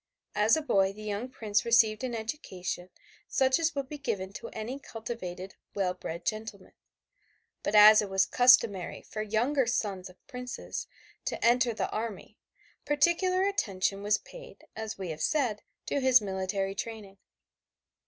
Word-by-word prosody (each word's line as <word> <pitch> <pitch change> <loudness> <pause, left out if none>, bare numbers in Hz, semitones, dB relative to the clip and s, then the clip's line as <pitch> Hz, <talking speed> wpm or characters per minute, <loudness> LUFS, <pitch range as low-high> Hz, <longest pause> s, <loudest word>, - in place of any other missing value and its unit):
As 210 +6 +4
a 315 - -2
boy 195 -8 +2
the 215 +1 -11
young 210 +4 -3
prince 215 -5 0
received 230 -1 +4
an 245 -2 -2
education 190 - -5 0.4
such 265 +2 +2
as 325 -1 0
would 275 -2 -2
be 295 +1 -8
given 200 -8 -3
to - - -7
any 235 +5 -5
cultivated 205 -7 -7 0.2
well 190 -3 0
bred 170 -1 -7
gentleman, 215 -3 -4 0.9
but 205 - -1
as 210 +1 +9
it 205 - -4
was 195 0 +3
customary 230 -7 +4
for 215 - -6
younger 235 +5 +1
sons 200 -6 -2
of 180 - -20
princes 250 0 -6 0.4
to - - -2
enter 240 0 +4
the 225 - -3
army 220 -1 -5 0.4
particular 345 +5 +2
attention 200 - 0
was 210 +1 +2
paid, - - -13
as 220 -1 -5
we 190 -3 -5
have 155 - -7
said, 250 -9 0 0.2
to - - -1
his 260 -1 +6
military 195 -1 -2
training. 200 -2 -7
215 Hz, 155 wpm, -29 LUFS, 195-250 Hz, 0.9 s, as